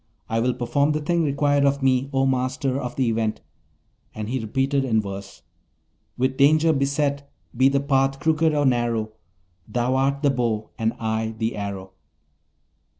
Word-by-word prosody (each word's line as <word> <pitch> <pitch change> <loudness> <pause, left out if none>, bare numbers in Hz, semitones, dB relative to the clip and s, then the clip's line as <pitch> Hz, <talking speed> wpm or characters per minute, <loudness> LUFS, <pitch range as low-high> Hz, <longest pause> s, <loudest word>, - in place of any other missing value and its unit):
I 115 - -1
will 125 +2 +1
perform 140 +4 +1
the 155 - -1
thing 170 +3 0
required 145 -1 +2
of 140 0 +1
me, 130 0 +2
O 135 -1 +1
Master 130 +1 -1
of 125 -1 -5
the 130 -2 +1
Event.' 110 -1 -1 0.7
And 110 0 -5
he 130 +2 -1
repeated 135 +5 0
in 115 -4 +1
verse: 100 -1 -7 0.7
With 130 +1 0
danger 155 +3 +4
beset, 140 0 -1 0.2
be 130 +3 +4
the 140 0 +1
path 135 -1 +1
crooked 160 0 +2
or 145 -1 +1
narrow, 120 -4 0 0.6
Thou 125 +1 0
art 140 +2 0
the 140 - +4
bow, 115 -4 -2
and 110 0 +1
I 110 0 -2
the 110 +1 -2
arrow. 100 -2 -5
130 Hz, 160 wpm, -23 LUFS, 115-140 Hz, 0.7 s, danger